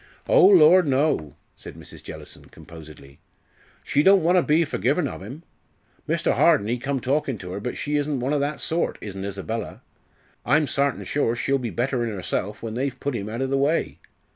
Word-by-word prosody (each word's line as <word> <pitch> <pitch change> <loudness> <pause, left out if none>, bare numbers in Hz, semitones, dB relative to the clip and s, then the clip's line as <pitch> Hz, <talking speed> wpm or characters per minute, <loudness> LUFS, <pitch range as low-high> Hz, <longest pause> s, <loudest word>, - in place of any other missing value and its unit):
"Oh, - - +6
lor' 185 -2 +7
no!" 135 - 0 0.2
said - - -11
Mrs. - - -13
Jellison, - - -11
composedly. 75 -4 -14 0.6
"She 145 - +1
don't 190 +1 +5
want 175 +3 +3
to 180 - +5
be 160 +1 +2
forgivin' 140 - 0
of - - -8
'im. 130 - -9 0.7
Mr. - - +1
Harden 100 - +3
ee 120 +1 -1
come 135 +2 -2
talkin' 135 -1 -1
to 90 -1 -8
'er, 100 - -4
but 125 +4 -5
she 150 0 -1
isn't 145 -2 -1
one 130 +4 -1
o' 145 - +1
that 145 +2 -2
sort, 165 +1 -2
isn't 95 -2 -7
Isabella. 100 +3 -5 0.6
I'm 150 +5 +2
sartin 140 -1 -1
sure 130 -5 -1
she'll 135 +3 0
be 120 -2 -4
better 125 +2 -1
in 120 - -2
'erself 105 +1 -4
when 110 -1 -5
they've 130 +1 -3
put 140 -2 -3
'im 105 -1 -4
out 115 +4 -3
o' - - 0
the 135 +1 0
way. 150 +4 0
135 Hz, 195 wpm, -23 LUFS, 110-150 Hz, 0.7 s, lor